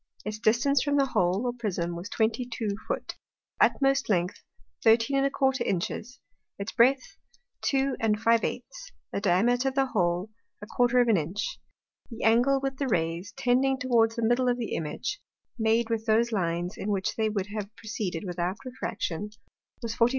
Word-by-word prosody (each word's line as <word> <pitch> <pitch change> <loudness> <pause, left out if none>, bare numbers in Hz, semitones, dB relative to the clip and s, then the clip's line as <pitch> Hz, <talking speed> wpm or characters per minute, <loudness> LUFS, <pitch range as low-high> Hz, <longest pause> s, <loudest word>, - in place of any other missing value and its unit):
Its 210 0 -4
distance 240 +5 +3
from 285 -1 +1
the 275 - +4
Hole 190 -3 +1
or 245 - 0
Prism 180 -8 -3
was 175 +5 -6
twenty 225 +3 0
two 230 -4 -3
Foot; - - -3 0.5
its - - +5
utmost 275 -2 +1
length 180 -2 0 0.4
13¼ 265 +3 +3
Inches; 195 +7 -2 0.4
its 200 +2 -4
breadth 255 +3 +2 0.4
2⅝; 230 -4 +1 0.5
the - - -2
Diameter 235 +7 +3
of 265 - -10
the 270 0 +3
Hole 180 -3 0 0.5
¼ 245 0 +4
of - - -4
an 220 -4 +4
Inch; 175 +6 -3 0.5
the 230 -2 -7
Angle, 245 +5 +4
with 270 -1 -2
the 275 - -1
Rays, 170 -1 -1
tending 260 +4 +2
towards 235 -4 +2
the 230 - -2
middle 245 +2 +3
of 245 - +1
the 235 -3 -4
Image, 165 - -3 0.4
made 225 +1 +2
with 225 0 -2
those 230 +2 +3
Lines, 175 -3 -1
in 205 - -4
which 195 -2 -1
they 220 -1 +1
would 205 -2 -2
have 205 -2 -4
proceeded 210 -6 -4
without 180 +1 -2
Refraction, 210 -7 -4 0.5
was 230 -1 -2
44° - - -19
56'. 230 - +6
225 Hz, 165 wpm, -27 LUFS, 200-250 Hz, 0.5 s, 56